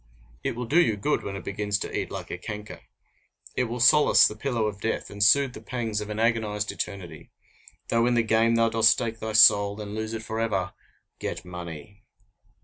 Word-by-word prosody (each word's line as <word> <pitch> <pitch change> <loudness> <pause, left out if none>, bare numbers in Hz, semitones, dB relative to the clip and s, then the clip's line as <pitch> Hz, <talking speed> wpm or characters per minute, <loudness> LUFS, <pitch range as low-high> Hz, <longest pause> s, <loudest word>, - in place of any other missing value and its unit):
It - - -2
will 125 +1 -4
do 155 +9 +4
you 110 -11 +1
good 145 +9 0
when 100 - -6
it 95 - -7
begins 105 +1 -2
to - - -6
eat - - -2
like - - -7
a - - -4
canker! 105 +2 -8 0.7
It 125 - +1
will 120 +1 -5
solace 150 +5 +6
the 105 - -6
pillow 115 -1 -2
of 105 -1 -4
death, 115 - -3
and 100 0 -1
soothe 135 +4 +4
the - - -10
pangs 115 -4 -3
of 105 - -7
an 105 - -5
agonized 110 -2 0
eternity! 90 -6 -7 0.6
Though 115 +1 +2
in 125 - +2
the 120 - +3
game 115 +1 +2
thou 115 0 +3
dost 115 0 +4
stake 110 0 0
thy 110 0 -5
soul, 100 -1 +6
and 105 -1 -7
lose 110 +1 -4
it 110 - -6
forever 110 -4 -2 0.5
get - - -5
money! 90 +3 -9
110 Hz, 205 wpm, -25 LUFS, 105-115 Hz, 0.7 s, solace